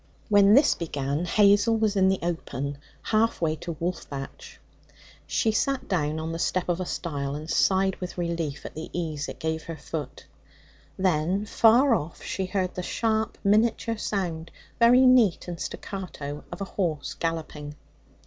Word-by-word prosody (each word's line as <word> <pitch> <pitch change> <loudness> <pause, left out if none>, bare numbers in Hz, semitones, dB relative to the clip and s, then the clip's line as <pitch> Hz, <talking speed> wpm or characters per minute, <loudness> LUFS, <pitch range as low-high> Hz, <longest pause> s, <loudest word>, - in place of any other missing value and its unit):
When 205 0 +6
this 280 - +6
began, 145 0 -2
Hazel 205 +5 +4
was 215 -2 +1
in 190 -1 +4
the 190 - +2
open, 140 -5 -3 0.2
half 225 +1 +1
way 155 -2 +1
to 170 +2 -6
Wolfbatch. 175 - -5 0.7
She 225 - +1
sat 270 +5 0
down 155 -4 0
on 160 +1 -4
the 165 - -4
step 185 +1 0
of 175 0 0
a 185 - -3
stile, 140 -4 -3
and 155 +1 -7
sighed 190 +2 +2
with 180 0 -7
relief 170 -4 -3
at - - -7
the 160 +1 -7
ease 155 -4 -3
it - - -7
gave 160 0 -3
her 165 -1 -6
foot. 150 -2 -6 0.7
Then, 185 +2 +1
far 235 +5 +5
off 165 -6 -3
she 190 -1 -3
heard 185 -1 -1
the 180 - -4
sharp 220 +3 -1
miniature 225 +2 +2
sound, 175 -6 -3 0.3
very 245 +2 +6
neat 245 -10 +4
and 175 -2 -5
staccato, 150 -7 -6
of 175 - -7
a - - -1
horse 170 -7 -2
galloping. 155 -3 -4
175 Hz, 160 wpm, -26 LUFS, 160-205 Hz, 0.7 s, When